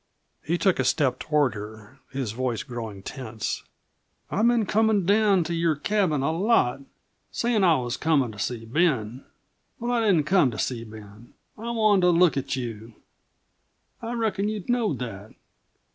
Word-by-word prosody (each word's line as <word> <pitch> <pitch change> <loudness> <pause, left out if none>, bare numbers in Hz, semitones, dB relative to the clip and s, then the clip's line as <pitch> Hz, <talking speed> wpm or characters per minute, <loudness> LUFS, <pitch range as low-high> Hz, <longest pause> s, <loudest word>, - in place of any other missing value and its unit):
He 170 +3 0
took 190 0 +2
a - - +3
step 130 -5 +1
toward 150 -4 +1
her, 110 +4 -10
his 130 -5 -3
voice 125 +3 -2
growing 115 -7 -7
tense. 110 -4 -5 0.7
"I've 215 +5 +2
been 240 -2 +3
comin' 215 -2 +2
down 200 -2 +3
to 170 +1 -4
your 165 -1 +1
cabin 160 -3 0
a 150 - +1
lot, 165 - +2 0.5
sayin' 235 -3 0
that 190 - +5
I 165 - +5
was 125 -2 -2
comin' 145 -7 +1
to 105 - -12
see 115 +2 -3
Ben. 125 -4 0 0.6
But 240 +1 -2
I 240 -1 +1
didn't 175 -7 +4
come 175 -4 +4
to 110 - -7
see 120 -3 -2
Ben 110 0 -13 0.2
I 230 +2 -6
wanted 215 -4 +3
to - - +6
look 175 -1 +4
at 135 -1 -2
you. 115 -3 -6 1.1
I 230 +1 -4
reckon 215 -3 -1
you 215 -3 -4
knowed 235 - +1
that. 110 -4 -7
150 Hz, 170 wpm, -25 LUFS, -, 1.1 s, to